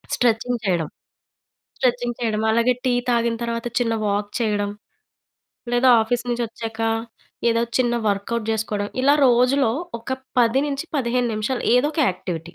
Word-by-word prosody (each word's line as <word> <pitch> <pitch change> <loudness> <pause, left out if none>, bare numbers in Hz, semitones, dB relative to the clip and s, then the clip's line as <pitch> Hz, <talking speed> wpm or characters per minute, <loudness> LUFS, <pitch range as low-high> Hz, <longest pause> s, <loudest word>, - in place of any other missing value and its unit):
Stretching 240 0 +1
చేయడం, 170 -5 0 0.9
stretching 245 -2 0
చేయడం. 220 -2 0
అలాగే 235 +2 +3
టీ 250 - +3 0.2
తాగిన 235 -1 +1
తర్వాత, 230 0 -3
చిన్న 230 -2 +1
వాక్ 205 0 -1
చేయడం. 205 -2 0 1.0
లేదా 245 +1 +5
ఆఫీస్ 245 +2 -1
నుంచి 240 0 0
ఒచ్చాక, 225 0 -7 0.7
ఏదో 230 0 +2 0.2
చిన్న 240 -1 +2
వర్క్‌ఔట్ 210 +3 -2
చేసుకోవడం. 210 -2 -2
ఇలా 280 +2 +5
రోజులో 250 0 +3 0.3
ఒక 245 +3 -5 0.3
10 240 +3 +3
నుంచి 280 +2 -3
15 245 -1 0
నిమిషాలు 225 +4 -2
ఏదో 280 +4 +3
ఒక - - 0
యాక్టివిటీ. 175 -2 -6
235 Hz, 140 wpm, -22 LUFS, 215-245 Hz, 1.0 s, లేదా